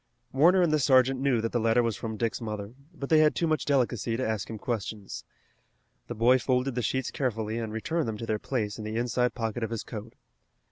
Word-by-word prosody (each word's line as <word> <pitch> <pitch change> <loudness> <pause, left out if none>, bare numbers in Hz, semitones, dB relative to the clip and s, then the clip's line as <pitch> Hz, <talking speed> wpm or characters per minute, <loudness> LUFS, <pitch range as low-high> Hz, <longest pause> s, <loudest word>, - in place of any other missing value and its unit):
Warner 175 +7 +5
and 160 -3 +2
the 155 - +3
sergeant 130 -1 +4
knew 130 -4 +2
that 115 - -2
the 120 - +1
letter 115 +2 +3
was 115 -3 0
from 110 -1 -5
Dick's 115 +1 -1
mother, 105 -1 -5 0.2
but 140 -5 -7
they 155 - +6
had 155 -1 +4
too 170 - +1
much 155 -4 0
delicacy 120 -5 +1
to 130 - -1
ask 110 -2 -2
him 110 - -5
questions. 105 -3 -4 0.8
The 120 - -5
boy 120 +4 +4
folded 130 +1 0
the 125 - -1
sheets 130 +4 -1
carefully 110 -4 -2
and 110 -2 -4
returned 155 +8 -2
them 110 -1 -3
to 115 - -5
their 110 -1 -1
place 110 -5 -3
in - - -5
the 110 +1 -4
inside 125 +1 0
pocket 115 -1 -3
of 110 - -1
his 115 -2 -4
coat. 110 +1 -8
120 Hz, 230 wpm, -28 LUFS, 110-130 Hz, 0.8 s, they